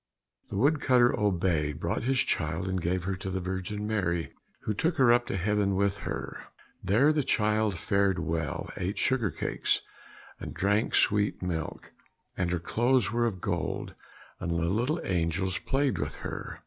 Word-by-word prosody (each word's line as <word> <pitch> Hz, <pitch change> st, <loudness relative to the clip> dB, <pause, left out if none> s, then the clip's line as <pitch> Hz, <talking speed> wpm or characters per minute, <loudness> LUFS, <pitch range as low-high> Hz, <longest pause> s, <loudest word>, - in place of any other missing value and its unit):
The -, -, -4 dB
wood 145 Hz, +7 st, +3 dB
cutter 125 Hz, -2 st, +4 dB
obeyed, 85 Hz, -7 st, 0 dB
brought 85 Hz, +1 st, -1 dB
his 130 Hz, +3 st, +2 dB
child, 80 Hz, +3 st, -1 dB
and 95 Hz, -1 st, -1 dB
gave 90 Hz, +1 st, 0 dB
her 95 Hz, +1 st, -1 dB
to 95 Hz, 0 st, -5 dB
the 95 Hz, 0 st, -2 dB
Virgin 95 Hz, +3 st, -3 dB
Mary, 90 Hz, -6 st, -1 dB, 0.3 s
who 110 Hz, -, -1 dB
took 160 Hz, -, 0 dB
her 125 Hz, -4 st, +6 dB
up 120 Hz, 0 st, +2 dB
to -, -, -2 dB
heaven 100 Hz, +1 st, +1 dB
with 100 Hz, +1 st, +1 dB
her. 100 Hz, -, -5 dB, 0.4 s
There 115 Hz, +11 st, +4 dB
the 150 Hz, -, +2 dB
child 105 Hz, -5 st, +1 dB
fared 100 Hz, +2 st, +1 dB
well, 80 Hz, -2 st, -2 dB
ate 95 Hz, +4 st, -2 dB
sugar 125 Hz, -6 st, +1 dB
cakes, -, -, 0 dB, 0.6 s
and -, -, -7 dB
drank 105 Hz, +3 st, +1 dB
sweet 105 Hz, -2 st, +2 dB
milk, 80 Hz, -3 st, -4 dB, 0.4 s
and 90 Hz, -2 st, 0 dB
her 90 Hz, -, 0 dB
clothes 120 Hz, +3 st, +2 dB
were 120 Hz, +1 st, +2 dB
of 95 Hz, -6 st, -4 dB
gold, 85 Hz, -3 st, -2 dB, 0.5 s
and -, -, -3 dB
the 85 Hz, -, 0 dB, 0.2 s
little 125 Hz, -, 0 dB
angels 90 Hz, +1 st, 0 dB
played 135 Hz, 0 st, 0 dB
with -, -, -3 dB
her. -, -, -5 dB
100 Hz, 170 wpm, -29 LUFS, 90-115 Hz, 0.6 s, her